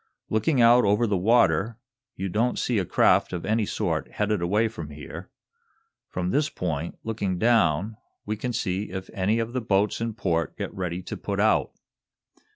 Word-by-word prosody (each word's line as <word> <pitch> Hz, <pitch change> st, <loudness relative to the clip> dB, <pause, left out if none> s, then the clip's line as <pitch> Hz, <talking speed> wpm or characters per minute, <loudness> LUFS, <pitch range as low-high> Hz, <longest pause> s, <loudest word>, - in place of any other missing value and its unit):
Looking 110 Hz, +6 st, +2 dB
out 120 Hz, +1 st, +6 dB
over 105 Hz, +4 st, +3 dB
the 105 Hz, -3 st, 0 dB
water 100 Hz, 0 st, +3 dB, 0.4 s
you 95 Hz, -, -3 dB
don't 115 Hz, +6 st, 0 dB
see 120 Hz, -4 st, 0 dB
a 95 Hz, -, -1 dB
craft -, -, +3 dB
of 85 Hz, -, -4 dB
any 110 Hz, +1 st, +1 dB
sort -, -, -2 dB
headed 105 Hz, -2 st, 0 dB
away 105 Hz, +6 st, +2 dB
from 85 Hz, -9 st, -7 dB
here. 75 Hz, 0 st, -9 dB, 0.8 s
From 90 Hz, 0 st, -2 dB
this 150 Hz, +1 st, +1 dB
point, 85 Hz, -, -4 dB
looking 100 Hz, -5 st, -2 dB
down, 105 Hz, -2 st, +2 dB, 0.3 s
we 110 Hz, -, -2 dB
can 120 Hz, +4 st, -3 dB
see 100 Hz, -3 st, -2 dB
if 95 Hz, 0 st, -6 dB
any 100 Hz, +4 st, +1 dB
of 115 Hz, +1 st, -2 dB
the 130 Hz, -, -1 dB
boats 105 Hz, -1 st, +1 dB
in 115 Hz, -2 st, -2 dB
port 85 Hz, -7 st, -1 dB
get -, -, -4 dB
ready 90 Hz, -1 st, -4 dB
to -, -, -6 dB
put -, -, -4 dB
out. -, -, +2 dB
105 Hz, 175 wpm, -25 LUFS, 90-115 Hz, 0.8 s, out